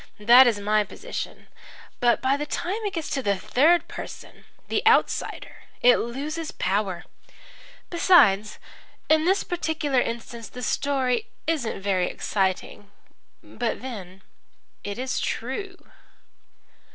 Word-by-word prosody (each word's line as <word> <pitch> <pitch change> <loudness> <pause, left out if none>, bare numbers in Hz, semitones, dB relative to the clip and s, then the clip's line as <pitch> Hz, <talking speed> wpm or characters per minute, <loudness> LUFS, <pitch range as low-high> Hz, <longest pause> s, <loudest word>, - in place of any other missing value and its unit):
That 240 +5 +7
is 225 -4 +1
my 210 +1 +2
position. 440 - -7 0.5
But 240 -1 +2
by 265 +1 +3
the 295 +1 -4
time 390 +9 -3
it 405 - -2
gets 325 -3 -3
to 270 - -1
the 200 -5 +1
third 315 - +3
person - - -10 0.2
the - - -1
outsider 455 - +1 0.3
it 245 0 +7
loses 300 +7 -4
power. 190 -2 -2 0.9
Besides, 245 - +4 0.5
in 315 0 +4
this 380 +3 +2
particular 315 -6 -1
instance 230 -1 -5
the 250 - -8
story 255 -3 0 0.2
isn't 290 -11 -2
very 185 -3 +1
exciting. 195 +1 -2 0.5
But 240 0 -4
then 195 -7 -8 0.6
it's 245 +6 -3
true." 370 - -4
250 Hz, 115 wpm, -25 LUFS, 210-310 Hz, 0.9 s, That